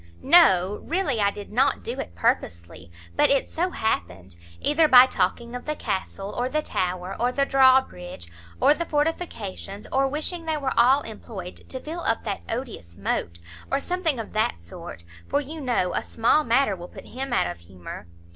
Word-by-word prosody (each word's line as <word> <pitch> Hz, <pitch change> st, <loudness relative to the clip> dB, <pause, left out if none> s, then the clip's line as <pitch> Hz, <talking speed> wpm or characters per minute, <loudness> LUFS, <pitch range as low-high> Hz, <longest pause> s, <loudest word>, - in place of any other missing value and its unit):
"No, 210 Hz, -, +5 dB
really, 330 Hz, -, 0 dB
I 200 Hz, -, +4 dB
did 205 Hz, 0 st, -9 dB
not 260 Hz, +6 st, +2 dB
do 245 Hz, +3 st, -5 dB
it 85 Hz, -, -6 dB
purposely; 85 Hz, +1 st, -2 dB, 0.3 s
but -, -, +4 dB
it 275 Hz, -1 st, +2 dB
so 355 Hz, +3 st, -1 dB
happened; 95 Hz, -, -3 dB, 0.2 s
either 310 Hz, +2 st, +3 dB
by 255 Hz, -3 st, +9 dB
talking 235 Hz, +1 st, -1 dB
of 245 Hz, -, -7 dB
the 305 Hz, -, -2 dB
castle, 195 Hz, -3 st, -4 dB
or 245 Hz, +1 st, -1 dB
the 305 Hz, +2 st, -1 dB
tower, 185 Hz, -3 st, -2 dB
or 245 Hz, +2 st, +2 dB
the 275 Hz, +2 st, +1 dB
draw 265 Hz, -1 st, +6 dB
bridge, 90 Hz, -, -10 dB, 0.3 s
or -, -, +6 dB
the 340 Hz, +2 st, -4 dB
fortifications; 290 Hz, -, -3 dB
or 270 Hz, +1 st, +2 dB
wishing 315 Hz, +4 st, -3 dB
they 315 Hz, -1 st, 0 dB
were 270 Hz, -3 st, -2 dB
all 260 Hz, +4 st, +5 dB
employed 210 Hz, -5 st, -8 dB
to 260 Hz, -, -4 dB
fill 320 Hz, +6 st, -6 dB
up 225 Hz, -8 st, 0 dB
that 205 Hz, -3 st, -3 dB
odious 225 Hz, -, -5 dB
moat; 85 Hz, 0 st, -2 dB, 0.3 s
or 275 Hz, -, +1 dB
something 345 Hz, -3 st, 0 dB
of 225 Hz, -, -7 dB
that 215 Hz, -, 0 dB
sort; 85 Hz, 0 st, -10 dB, 0.2 s
for 285 Hz, -, +1 dB
you 300 Hz, +3 st, -7 dB
know 235 Hz, -9 st, 0 dB
a -, -, 0 dB
small 235 Hz, +7 st, +2 dB
matter 240 Hz, -4 st, +2 dB
will 175 Hz, -1 st, -9 dB
put -, -, -12 dB
him 265 Hz, +1 st, -5 dB
out 240 Hz, -, +2 dB
of 85 Hz, 0 st, -5 dB
humour." 85 Hz, 0 st, -10 dB
240 Hz, 185 wpm, -25 LUFS, 185-285 Hz, 0.3 s, by